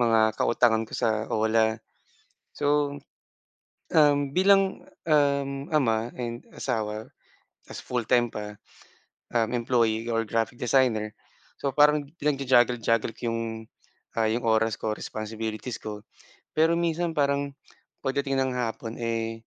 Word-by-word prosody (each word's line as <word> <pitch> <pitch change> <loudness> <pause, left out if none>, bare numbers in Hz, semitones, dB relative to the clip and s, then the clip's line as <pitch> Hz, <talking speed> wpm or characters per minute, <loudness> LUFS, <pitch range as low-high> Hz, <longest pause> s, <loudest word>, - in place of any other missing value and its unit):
mga 110 -2 +3
kautangan 115 -2 +3
ko - - -17
sa 110 -1 0
OLA. 110 0 +2 0.8
So, 145 0 +1 1.0
um, 145 -3 +4
bilang, 195 +2 +3 0.2
um, 140 -2 +1
ama 115 -7 +2
and 120 -1 -4 0.2
asawa 110 -3 -3 0.6
ta's - - -7
full-time 120 -1 +1
pa, 105 0 -6 0.8
um, 115 -2 +2
employee 115 -2 +1
or 115 0 +1
graphic 115 +1 -1
designer, 120 -4 +2 0.5
so 140 -2 -2
parang 150 0 +4 0.2
pinag-ju-juggle 130 -4 +3
juggle 115 0 +1
ko - - -17
'yong, 115 - -1 0.8
ah, 110 -1 +2
'yong 115 +2 -1
oras 110 0 +2
ko, 110 - -2
responsibilities 110 +2 -5
ko. 105 -1 -7 0.5
Pero 160 +2 +4
minsan 170 0 0
parang, 140 -1 +1 0.5
pagdating 135 0 0
ng 130 -1 0
hapon 115 -1 -3
eh 115 -1 -3
120 Hz, 120 wpm, -26 LUFS, 110-140 Hz, 1.0 s, um